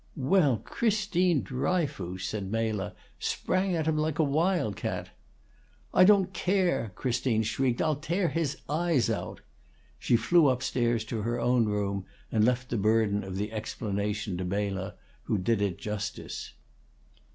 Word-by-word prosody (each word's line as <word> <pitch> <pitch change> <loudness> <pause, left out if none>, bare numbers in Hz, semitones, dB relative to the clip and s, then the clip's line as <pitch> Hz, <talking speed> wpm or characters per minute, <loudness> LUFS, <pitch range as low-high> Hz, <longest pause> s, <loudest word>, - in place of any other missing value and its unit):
"Well, 140 -2 +3
Christine 185 - +1
Dryfoos!" 130 - -2
said 100 -3 -4
Mela, 110 -3 -1 0.2
"Sprang 185 0 0
at 160 -2 -1
him 155 -1 +1
like 155 -1 0
a 160 - +4
wild 155 - +1
cat!" - - -4 0.8
"I 185 - +7
don't 195 -2 +4
care," 180 - +1
Christine 120 -3 0
shrieked. 120 +3 0
"I'll 155 -3 +1
tear 170 +4 0
his 160 -2 -1
eyes 155 -4 +1
out!" - - -4 0.6
She 120 - +3
flew 150 +7 +4
up 130 -1 +1
stairs 120 -2 +1
to 110 -1 -3
her 120 +3 -1
own 125 -2 +3
room, 100 -2 -1 0.3
and 110 -2 +3
left 125 +2 +1
the 120 - +1
burden 105 0 +2
of 95 -1 -6
the 105 +2 -2
explanation 105 -2 -3
to 95 - -3
Mela, 95 0 -2 0.3
who - - +1
did 100 +3 +1
it 100 -4 0
justice. 105 -9 -5
120 Hz, 150 wpm, -28 LUFS, 105-160 Hz, 0.8 s, I